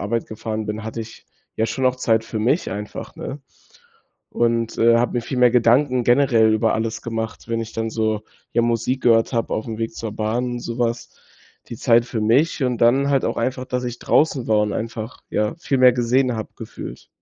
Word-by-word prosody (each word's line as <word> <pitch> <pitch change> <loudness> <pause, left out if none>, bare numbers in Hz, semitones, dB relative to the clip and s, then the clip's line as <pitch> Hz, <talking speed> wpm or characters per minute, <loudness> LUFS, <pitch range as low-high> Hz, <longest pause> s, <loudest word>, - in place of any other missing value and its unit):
Arbeit 115 +3 -2
gefahren 110 0 -4
bin, 105 +1 -4
hatte 110 +1 -5
ich 115 0 -10 0.3
ja 110 - +1
schon 130 +4 -3
auch 130 0 +1
Zeit 110 -3 +1
für 110 - -4
mich 125 +10 +1
einfach, 105 +2 -7
ne? 145 - -6 0.9
Und, 115 -1 0
äh, 115 +1 +5
habe 120 - 0
mir 120 - 0
viel 130 - -4
mehr 125 -1 +6
Gedanken 125 +2 +3
generell 120 -3 +4
über 110 +1 +2
alles 110 0 -3
gemacht, 115 -1 -5
wenn 115 0 -1
ich 115 0 -6
dann 115 0 -2
so, 110 -1 -1 0.3
ja, 120 - +2
Musik 120 +2 0
gehört 115 +1 +4
habe 115 -1 -1
auf'm 110 0 -4
Weg 115 0 -2
zur 110 -2 -5
Bahn, 120 +3 -2
so 115 0 -5
was, 115 -1 -1 0.6
die - - -7
Zeit 115 0 +3
für 115 -2 -3
mich 135 +8 +2
und 125 -2 0
dann 135 +4 +4
halt 135 -2 +2
auch - - -1
einfach, 130 0 -1
dass 125 0 -2
ich 120 -1 -5
draußen 145 -5 +2
war 105 -1 +4
und 105 -1 0
einfach, 115 +1 -5
ja, 105 0 0
viel 140 -5 -1
mehr 125 -1 +7
gesehen 125 0 +1
habe, 110 - -5
gefühlt. - - -9
115 Hz, 205 wpm, -21 LUFS, 110-125 Hz, 0.9 s, mehr